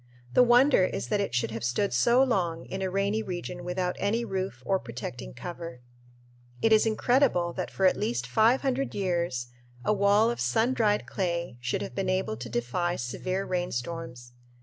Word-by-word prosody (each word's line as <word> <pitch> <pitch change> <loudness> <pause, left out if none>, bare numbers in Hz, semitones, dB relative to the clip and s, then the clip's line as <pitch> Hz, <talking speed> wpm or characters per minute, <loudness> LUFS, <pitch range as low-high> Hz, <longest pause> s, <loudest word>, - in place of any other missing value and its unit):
The - - +6
wonder 245 -2 +5
is - - -4
that 210 -1 +1
it 120 -12 -2
should 120 -2 0
have 115 +1 -5
stood 125 +12 0
so 245 +2 +4
long 175 -10 0
in 190 - -5
a 190 - -1
rainy 200 +3 0
region 175 -2 -5
without 180 0 -2
any 225 +4 0
roof 190 - -4
or 190 -1 +2
protecting 120 - -7
cover. 170 -7 -7 0.8
It 225 - +4
is 220 +1 +5
incredible 220 -6 +2
that - - -4
for 190 - 0
at 185 - +5
least 120 +1 -2
five 220 - +3
hundred 270 0 -1
years 170 -10 -1 0.4
a - - +3
wall 205 +3 +4
of - - -5
sun 220 - +2
dried 210 -4 +1
clay 170 -7 -2
should 120 0 -2
have - - -7
been 190 +7 -2
able 185 -11 0
to 120 0 -7
defy 125 +10 -1
severe 185 +10 -3
rainstorms. 165 -7 -4
185 Hz, 180 wpm, -28 LUFS, -, 0.8 s, The